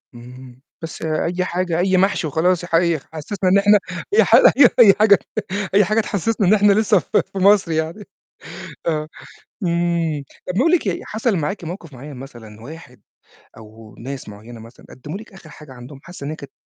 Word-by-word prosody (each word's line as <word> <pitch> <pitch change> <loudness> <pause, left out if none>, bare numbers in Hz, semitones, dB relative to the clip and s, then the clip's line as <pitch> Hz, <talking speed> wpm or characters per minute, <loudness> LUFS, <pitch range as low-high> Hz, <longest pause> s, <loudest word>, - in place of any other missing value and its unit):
اهم، 125 +1 -13 0.2
بس 165 - -8
أي 170 +3 -2
حاجة 175 -2 -2
أي 185 +1 +2
محشي 190 -3 +1
وخلاص 175 +4 0
حي 170 -2 +1
خ - - -25
حسّسنا 185 +5 -3
إن 190 - +4
إحنا 205 +1 +4 0.3
أي 415 - +5
حاجة - - +6 0.3
أي 215 -5 +8
حاجة 210 -2 +5 0.5
أي 205 0 +4
حاجة 215 +4 +1
تحسّسنا 210 0 -1
إن 195 - +5
إحنا 205 -1 +4
لسّه 210 -1 +3
في 195 - -2
مصر 195 -2 +3
يعني 160 +6 -3 0.8
آه، 155 -2 -2 0.6
إمم، 170 -3 -1 0.2
طَب 180 - -4
نقول 295 +8 +3
لِك 350 -11 +1
إيه 185 - -2
حصل 220 0 -1
معاكِ 165 +5 -4
موقِف 170 -2 -8
معيّن 140 +3 -10
مثلًا 120 -5 -12
واحد 155 +7 -13 0.6
أو 110 0 -15
ناس 135 +1 -8
معيّنة 110 +3 -12
مثلًا 115 +2 -16
قدّموا 150 +8 -8
لِك 220 +1 -14
آخِر 190 -5 -15
حاجة 150 -2 -14
عندهم 130 +2 -12
حاسّة 175 -4 -10
إن - - -4
هي 155 - -6
كانت 140 -2 -12
170 Hz, 180 wpm, -19 LUFS, 140-195 Hz, 0.8 s, أي